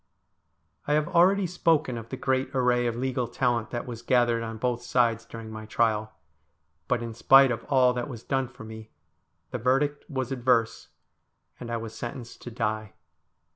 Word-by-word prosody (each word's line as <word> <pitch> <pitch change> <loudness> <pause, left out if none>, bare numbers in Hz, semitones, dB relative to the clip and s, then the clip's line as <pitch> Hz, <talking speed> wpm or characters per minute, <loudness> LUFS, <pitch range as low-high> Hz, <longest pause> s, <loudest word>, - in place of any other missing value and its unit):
I 145 - +2
have 150 0 +2
already 190 +3 +4
spoken 165 -6 +1
of 115 -1 -7
the 130 - -5
great 130 0 0
array 125 -1 +2
of 115 - -2
legal 125 0 -1
talent 120 -2 0
that 120 - -4
was 115 -2 -7
gathered 120 -1 +2
on 115 -1 -5
both 120 +1 -1
sides 115 -2 +1
during 115 -1 -9
my 110 0 -8
trial; 110 -1 +1 0.8
but, 120 -1 0
in 115 -1 -5
spite 135 +3 +6
of 115 -1 -3
all 130 -3 +4
that 125 +2 -3
was 120 -3 -8
done 135 -1 -1
for 120 - -13
me, 110 0 -10 0.6
the - - -3
verdict 135 +4 +1
was 130 -2 -3
adverse, 120 -3 +1 0.7
and 120 - -7
I 115 - -1
was 115 -1 -7
sentenced 120 0 -7
to - - -7
die. 110 -2 -3
120 Hz, 175 wpm, -27 LUFS, 115-130 Hz, 0.8 s, spite